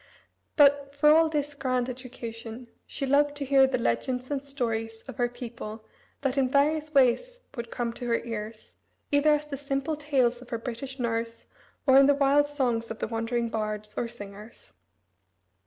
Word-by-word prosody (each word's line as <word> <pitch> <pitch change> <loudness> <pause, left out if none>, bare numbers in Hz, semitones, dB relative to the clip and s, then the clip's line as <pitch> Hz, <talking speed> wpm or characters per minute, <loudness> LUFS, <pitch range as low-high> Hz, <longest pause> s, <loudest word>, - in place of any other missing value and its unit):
But, 280 -1 +4
for 300 +1 +5
all 320 +1 +5
this 295 -2 -2
grand 255 -3 -1
education, 240 -2 -8 0.2
she 275 - -4
loved 290 +2 +3
to 285 -1 -4
hear 270 0 +5
the 260 -1 0
legends 250 - -1
and 280 -2 -1
stories 225 -5 -3
of 265 - -8
her 245 -1 +1
people 230 -3 -8 0.4
that 275 0 0
in 260 -2 +2
various 300 +3 +2
ways - - +3
would 235 -2 -5
come 235 -1 -3
to 245 - -6
her 230 -1 +2
ears, 220 -1 -6 0.4
either 295 +1 +5
as 295 0 -4
the 290 -2 -6
simple 280 +2 -2
tales 265 -5 +1
of 255 - -13
her 230 - -2
British 250 +3 -6
nurse, 230 -2 -3 0.4
or 265 -1 +7
in 275 - +6
the 285 - +5
wild 285 +1 +3
songs 245 -6 -1
of 225 - -5
the - - -3
wandering 230 +1 -1
bards, 215 -1 -4
or 240 - -1
singers. 205 - -11
255 Hz, 175 wpm, -27 LUFS, 230-285 Hz, 0.4 s, or